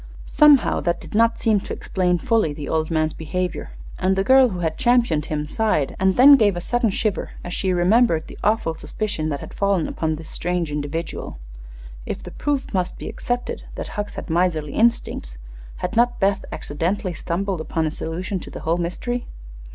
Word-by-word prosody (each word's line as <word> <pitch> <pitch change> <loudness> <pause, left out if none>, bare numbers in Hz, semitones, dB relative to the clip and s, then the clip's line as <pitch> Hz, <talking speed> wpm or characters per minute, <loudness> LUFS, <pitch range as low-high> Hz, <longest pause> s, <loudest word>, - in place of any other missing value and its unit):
Somehow 300 -3 +5
that 170 0 0
did - - -11
not 230 +2 +3
seem 215 -2 +3
to - - -6
explain 180 -2 0
fully 215 -4 +1
the 145 -1 -7
old 160 -1 0
man's 155 -1 0
behavior, 180 - -3 0.3
and 190 +1 +2
the 195 - +1
girl 260 +3 +6
who 180 -4 -5
had 160 -2 -1
championed 235 - +3
him 150 -1 -2
sighed 155 -4 0
and 190 0 +2
then 275 +3 +9
gave 205 -6 +3
a - - -1
sudden 240 +5 +1
shiver 205 0 -2
as 175 - -6
she 190 0 0
remembered 180 -1 +3
the - - -12
awful 210 -6 +1
suspicion 160 -2 -3
that 145 -2 -3
had - - -9
fallen 200 -5 +1
upon 160 -1 -2
this 160 0 -10
strange 175 -2 -2
individual. 150 - -4 0.7
If - - -4
the - - -8
proof 285 -5 -2
must 185 -2 -1
be - - -7
accepted 245 0 -3
that - - -5
Hucks 205 0 -5
had - - -6
miserly 160 -4 0
instincts, 220 - 0 0.4
had - - -4
not 240 +1 +3
Beth 195 0 +1
accidentally 180 +5 -2
stumbled 175 +2 -2
upon 160 0 -1
a 155 - -1
solution 175 +4 -4
of - - -10
the - - -7
whole 165 +2 0
mystery? 240 +8 -3
180 Hz, 190 wpm, -22 LUFS, 160-220 Hz, 0.7 s, then